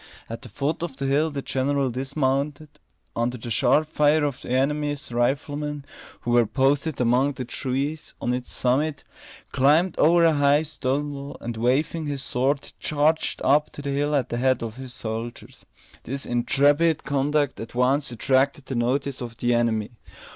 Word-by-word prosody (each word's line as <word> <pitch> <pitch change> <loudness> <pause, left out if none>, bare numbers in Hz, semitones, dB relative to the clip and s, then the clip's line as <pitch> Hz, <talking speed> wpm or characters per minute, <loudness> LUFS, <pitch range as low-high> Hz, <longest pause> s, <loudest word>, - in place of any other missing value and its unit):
At 115 - -6
the - - -10
foot 150 +4 -2
of 170 -6 -5
the 135 - -3
hill 145 +4 +2
the 140 -2 -5
general 135 0 0
dismounted, 140 +3 -1 0.5
under 120 +2 -1
the 115 +1 -7
sharp 150 +7 +3
fire 150 0 +3
of 140 -3 -2
the - - -9
enemy's 145 +2 0
riflemen, 145 +4 -1 0.4
who 120 - -2
were 120 -2 +4
posted 140 +5 +1
among 125 +4 +2
the 130 -1 -5
trees 135 +5 -3
on 120 - -1
its 125 0 -4
summit, 145 +4 0 0.5
climbed 155 +7 +3
over 170 +2 +5
a 165 - +5
high 145 +1 +3
stone 145 -1 -2
wall, 140 0 -7
and 120 0 -5
waving 140 +7 0
his 140 -2 -3
sword, 135 +2 -1
charged 150 +2 +1
up 145 +3 +3
the 140 -1 -5
hill 145 +2 0
at 135 -4 0
the 120 - -2
head 130 -1 +1
of 115 +1 -6
his 130 -1 -8
soldiers. 115 0 -6 0.3
This 135 +3 -5
intrepid 145 +6 +2
conduct 145 0 0
at 115 +1 -8
once 135 +2 +2
attracted 135 +4 +1
the 135 - -4
notice 130 +3 -1
of 120 -2 -7
the 120 0 +1
enemy. 115 -2 +1
140 Hz, 170 wpm, -24 LUFS, 125-145 Hz, 0.5 s, over